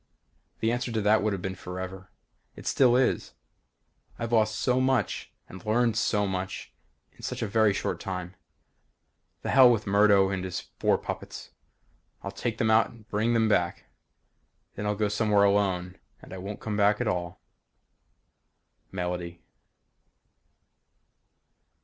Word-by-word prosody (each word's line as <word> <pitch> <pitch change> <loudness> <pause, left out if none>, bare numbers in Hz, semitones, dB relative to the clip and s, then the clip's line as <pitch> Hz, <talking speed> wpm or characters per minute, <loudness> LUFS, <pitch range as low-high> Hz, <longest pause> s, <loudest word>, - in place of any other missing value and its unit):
The 115 - +2
answer 120 0 -2
to 110 - 0
that 105 +1 +4
would 105 +1 0
have 95 -3 -4
been 95 - -2
forever. 95 0 -7 0.5
It - - -12
still 125 -2 +4
is. 130 0 +1 0.8
I've 115 0 -4
lost 110 -1 +3
so 125 0 +2
much 130 -5 0 0.2
and 95 0 -11
learned 115 +1 +2
so 105 -2 +1
much 95 -1 -4 0.4
in - - -19
such - - -4
a - - -1
very 110 +1 +3
short 100 - -2
time. 90 -2 -5 1.1
The - - -2
hell 130 -2 +8
with 110 -3 0
Murdo 100 -1 +4
and 95 -1 -2
his 95 -1 -3 0.2
four - - +3
puppets. - - -7 0.7
I'll 100 - -4
take 110 +3 -3
them 110 -1 +2
out 110 +1 +4
and 115 -2 -17
bring 110 +3 +1
them 115 -1 +3
back. 90 -5 0 0.8
Then 105 - -4
I'll 105 - 0
go 105 +1 0
somewhere 105 0 +2
alone 95 -3 +1 0.2
and - - -11
I 95 - -6
won't 100 +3 -7
come 110 -1 -3
back 105 0 +3
at - - -1
all. 90 0 -2 1.5
Melody. 90 -2 -4
105 Hz, 150 wpm, -27 LUFS, 95-110 Hz, 1.5 s, hell